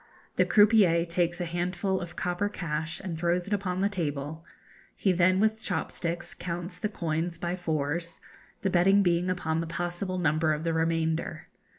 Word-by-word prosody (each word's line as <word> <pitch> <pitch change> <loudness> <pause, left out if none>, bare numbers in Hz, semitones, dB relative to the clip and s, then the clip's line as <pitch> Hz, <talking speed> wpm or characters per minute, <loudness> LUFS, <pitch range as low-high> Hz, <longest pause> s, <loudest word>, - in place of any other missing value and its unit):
The - - +4
croupier 205 -6 +5
takes 175 +1 0
a 175 - -1
handful 175 +3 -1
of 175 -1 -7
copper 180 +3 -1
cash 160 -3 -3
and 185 -4 -4
throws 175 +2 0
it 205 - -3
upon 185 -2 -1
the 200 - +4
table; 155 -4 -3 0.5
he 195 - +2
then 185 +1 +4
with 220 +1 +2
chop 180 -5 -2
sticks 170 0 -4
counts 175 +1 -5
the 210 - -1
coins 170 -2 -2
by 175 +1 -2
fours, 165 -1 -2 0.4
the 195 - 0
betting 195 +3 +5
being 175 0 +2
upon 165 -3 0
the 165 - -4
possible 175 +2 -3
number 160 -2 +2
of 150 +1 -3
the 165 -1 0
remainder. 160 -1 -1
175 Hz, 175 wpm, -28 LUFS, 165-185 Hz, 0.5 s, croupier